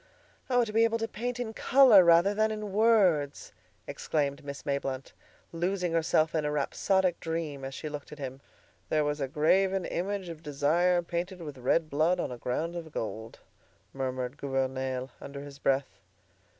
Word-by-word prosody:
"Oh! 245 Hz, -2 st, +3 dB
to 210 Hz, -, -7 dB
be 225 Hz, +1 st, +4 dB
able 230 Hz, 0 st, +2 dB
to 225 Hz, 0 st, -2 dB
paint 245 Hz, +3 st, -4 dB
in 225 Hz, -3 st, -3 dB
color 250 Hz, -6 st, +6 dB
rather 170 Hz, +4 st, +5 dB
than 215 Hz, +1 st, +2 dB
in 215 Hz, -2 st, -4 dB
words!" 190 Hz, -10 st, +2 dB, 0.3 s
exclaimed 140 Hz, -2 st, -2 dB
Miss 140 Hz, 0 st, -7 dB
Mayblunt, 135 Hz, -2 st, -3 dB, 0.4 s
losing 180 Hz, +1 st, -1 dB
herself 160 Hz, -1 st, +2 dB
in 160 Hz, -2 st, 0 dB
a 150 Hz, -, 0 dB
rhapsodic 180 Hz, +5 st, +1 dB
dream 160 Hz, -4 st, -4 dB
as 135 Hz, 0 st, -5 dB
she 155 Hz, -, -5 dB
looked 150 Hz, -1 st, -7 dB
at 150 Hz, -, -9 dB
him. 135 Hz, -1 st, -6 dB, 0.5 s
"'There 155 Hz, -1 st, +2 dB
was 145 Hz, 0 st, -2 dB
a 135 Hz, -, 0 dB
graven 185 Hz, +6 st, +2 dB
image 190 Hz, +1 st, -3 dB
of 165 Hz, -2 st, -8 dB
Desire 165 Hz, +5 st, +2 dB
Painted 175 Hz, +1 st, -4 dB
with 145 Hz, -4 st, -8 dB
red 155 Hz, +6 st, +1 dB
blood 155 Hz, +5 st, +1 dB
on -, -, -2 dB
a 125 Hz, -, -6 dB
ground 160 Hz, +9 st, -2 dB
of 165 Hz, -2 st, -6 dB
gold.'" 110 Hz, -2 st, -6 dB, 0.5 s
murmured 130 Hz, 0 st, -3 dB
Gouvernail, 130 Hz, -1 st, -2 dB
under 140 Hz, 0 st, -7 dB
his 140 Hz, -1 st, -11 dB
breath. 135 Hz, -8 st, 0 dB
160 Hz, 170 wpm, -29 LUFS, 140-190 Hz, 0.5 s, color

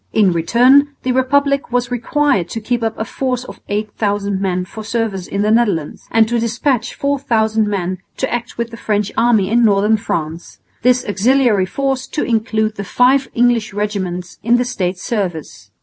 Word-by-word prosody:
In 205 Hz, -4 st, +4 dB
return 255 Hz, -, +4 dB
the 255 Hz, -, 0 dB
republic 275 Hz, +1 st, +1 dB
was 245 Hz, 0 st, 0 dB
required 245 Hz, -, 0 dB
to 225 Hz, -, -4 dB
keep 240 Hz, +2 st, -2 dB
up 225 Hz, -1 st, -2 dB
a 220 Hz, -, -3 dB
force 255 Hz, 0 st, -2 dB
of -, -, -11 dB
8000 205 Hz, -1 st, -2 dB
men 185 Hz, -2 st, -1 dB
for 215 Hz, +4 st, -9 dB
service 215 Hz, -4 st, -2 dB
in 200 Hz, +1 st, -1 dB
the 210 Hz, -, +2 dB
Netherlands, 210 Hz, -10 st, 0 dB
and 225 Hz, -1 st, +3 dB
to 235 Hz, +1 st, 0 dB
despatch 235 Hz, +1 st, -1 dB
4000 225 Hz, -6 st, 0 dB
men 185 Hz, -3 st, -2 dB, 0.2 s
to -, -, -2 dB
act 240 Hz, 0 st, -4 dB
with 235 Hz, 0 st, -3 dB
the 230 Hz, -, -9 dB
French 210 Hz, -2 st, -1 dB
army 220 Hz, -5 st, +2 dB
in 240 Hz, +1 st, +4 dB
northern 210 Hz, 0 st, +3 dB
France 165 Hz, -6 st, -4 dB, 0.2 s
this 250 Hz, +1 st, +3 dB
auxiliary 215 Hz, -1 st, +2 dB
force 270 Hz, +3 st, -2 dB
to 295 Hz, -, -2 dB
include 220 Hz, -2 st, 0 dB
the 200 Hz, -, -3 dB
five 260 Hz, +6 st, +2 dB
English 235 Hz, -4 st, +2 dB
regiments 190 Hz, -4 st, -3 dB
in 235 Hz, +2 st, +3 dB
the 245 Hz, -, 0 dB
States' 185 Hz, -7 st, -3 dB
service. 185 Hz, -9 st, -4 dB
225 Hz, 175 wpm, -17 LUFS, 200-245 Hz, 0.2 s, In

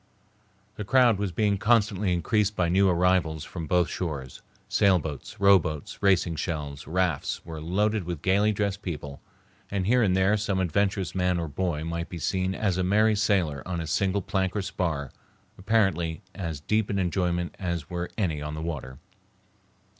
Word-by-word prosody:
The 105 Hz, -, -3 dB
crowd 120 Hz, -1 st, +4 dB
was 100 Hz, -2 st, -1 dB
being 100 Hz, +2 st, +1 dB
constantly 105 Hz, -3 st, +2 dB
increased 105 Hz, +4 st, +1 dB
by 90 Hz, -3 st, +1 dB
new 95 Hz, +2 st, +4 dB
arrivals 85 Hz, -3 st, +2 dB
from 85 Hz, -1 st, -6 dB
both 90 Hz, +1 st, +3 dB
shores, 70 Hz, -8 st, -5 dB, 0.3 s
sailboats, 85 Hz, -8 st, 0 dB
rowboats, 90 Hz, -7 st, +2 dB
racing 90 Hz, -4 st, +2 dB
shells, 75 Hz, -4 st, -4 dB
rafts, 85 Hz, -3 st, -1 dB
were 80 Hz, -2 st, -7 dB
loaded 105 Hz, +4 st, 0 dB
with 85 Hz, -3 st, -5 dB
gayly 100 Hz, +3 st, +3 dB
dressed 100 Hz, -1 st, -2 dB
people, 75 Hz, -7 st, -6 dB, 0.5 s
and 100 Hz, -2 st, -1 dB
here 125 Hz, +5 st, +3 dB
and 95 Hz, -4 st, +3 dB
there 95 Hz, +3 st, +3 dB
some 100 Hz, -2 st, -1 dB
adventurous 95 Hz, +1 st, 0 dB
man 90 Hz, -1 st, +1 dB
or 85 Hz, -1 st, -2 dB
boy 80 Hz, 0 st, -2 dB
might 85 Hz, +1 st, -4 dB
be 90 Hz, -, -6 dB
seen 95 Hz, +3 st, -1 dB
as 95 Hz, -4 st, 0 dB
a -, -, +1 dB
merry 105 Hz, +4 st, +3 dB
sailor 95 Hz, -9 st, +1 dB
on 90 Hz, -2 st, -2 dB
a 80 Hz, -, -3 dB
single 100 Hz, +3 st, 0 dB
plank 95 Hz, +1 st, -1 dB
or 105 Hz, -, -1 dB
spar, 80 Hz, -8 st, -2 dB, 0.4 s
apparently 95 Hz, -6 st, 0 dB
as 80 Hz, -6 st, -5 dB
deep 105 Hz, +7 st, 0 dB
in 100 Hz, -, -1 dB
enjoyment 90 Hz, -2 st, 0 dB
as 85 Hz, -5 st, -3 dB
were 85 Hz, 0 st, -4 dB
any 85 Hz, -9 st, -1 dB
on 75 Hz, +1 st, -5 dB
the 75 Hz, -, -5 dB
water. 70 Hz, -6 st, -5 dB
90 Hz, 170 wpm, -26 LUFS, 80-100 Hz, 0.5 s, crowd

